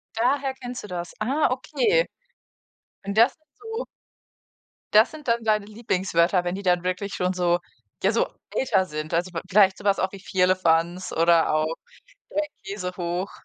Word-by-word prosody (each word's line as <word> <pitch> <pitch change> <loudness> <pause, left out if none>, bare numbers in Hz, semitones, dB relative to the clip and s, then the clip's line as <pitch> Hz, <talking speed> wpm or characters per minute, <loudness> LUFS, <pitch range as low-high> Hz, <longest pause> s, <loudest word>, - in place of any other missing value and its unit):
Daher 265 +3 +1
kennst 250 -2 -7
du 210 - -8
das. 175 -2 -5
Ah, 265 +6 +1
okay. 470 - +1 1.0
Und 200 +2 -4
das 235 +4 +5 0.2
so 450 +3 -5 1.1
das 220 +3 +7
sind 305 -4 -11
dann 235 0 +1
deine 215 -2 +1
Lieblingswörter, 190 -5 +1
wenn 175 +1 -2
die 200 - -5
dann 180 -1 +2
wirklich 185 +2 -2
schon 180 +1 0
so, 175 -1 +2 0.4
ja, - - +4
so - - +1 0.2
älter 195 -8 +1
sind. 155 0 -5
Also, 175 +2 0
vi 165 - -3
vielleicht 195 -1 +5
so - - -12
was 200 -1 +3
auch 185 - 0
wie 195 - -8
Firlefanz 180 -2 +1
oder 165 -1 +4
auch 155 +1 +1 0.5
Dreikäsehoch. 185 - -4
190 Hz, 155 wpm, -25 LUFS, 175-235 Hz, 1.1 s, das